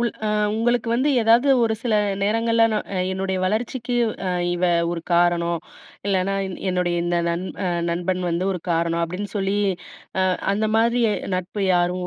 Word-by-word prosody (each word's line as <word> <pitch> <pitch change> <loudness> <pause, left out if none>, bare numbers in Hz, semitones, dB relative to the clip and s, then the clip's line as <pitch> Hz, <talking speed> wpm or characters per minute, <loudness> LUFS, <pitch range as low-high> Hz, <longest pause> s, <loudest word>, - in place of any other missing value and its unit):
உள் 235 -1 +1 0.4
உங்களுக்கு 230 +1 +1
வந்து 260 +5 +2
ஏதாவது 230 +4 +4 0.2
ஒரு 220 -1 +1
சில 235 -3 0 0.3
நேரங்கள்ல, 230 +2 +2
நான் 210 - -3 0.2
என்னுடைய 190 0 -2
வளர்ச்சிக்கு 235 +5 -2 0.6
இவ 175 +1 -1 0.3
ஒரு 170 -1 -3
காரணம், 170 -1 +2 0.5
இல்லனா 195 0 +1
என் 190 - -7
என்னுடைய 180 -1 0
இந்த 175 0 +1
நன் 170 +2 -3 0.4
நண்பன் 180 +2 -1
வந்து 170 +3 -1
ஒரு 180 - -5
காரணம் 170 0 +1
அப்டின்னு 180 +5 -4
சொல்லி, 195 0 0 0.6
அ 185 - +3 0.3
அந்த 215 +2 0
மாதிரி 235 +2 +2 0.3
நட்பு 185 +3 -4
யாரும் 180 +1 0
190 Hz, 145 wpm, -22 LUFS, 175-225 Hz, 0.6 s, ஏதாவது